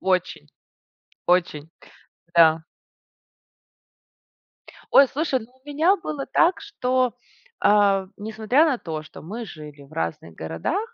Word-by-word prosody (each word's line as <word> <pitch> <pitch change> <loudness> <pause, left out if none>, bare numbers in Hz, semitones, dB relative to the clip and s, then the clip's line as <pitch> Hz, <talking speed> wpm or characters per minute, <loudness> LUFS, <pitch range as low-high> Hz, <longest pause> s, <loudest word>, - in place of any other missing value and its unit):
очень 185 - -1 0.8
очень, 165 -4 +1 0.7
да. 160 -1 +5 2.3
Ой, 275 - +7
слушай, 285 -2 -1
ну 230 +2 -14
у 260 +2 -31
меня 325 +7 +3
было 300 -5 -5
так, 350 +3 +3
что, 255 - 0 0.5
а 200 -2 +4
в - - -22
несмотря 220 +8 +1
на 275 -6 +1
то, 155 -5 -6
что 155 - -13
мы 220 +8 -6
жили 150 -5 -11
в 140 - -19
разных 85 0 -4
городах. 80 - -3
210 Hz, 120 wpm, -23 LUFS, 160-265 Hz, 2.3 s, Ой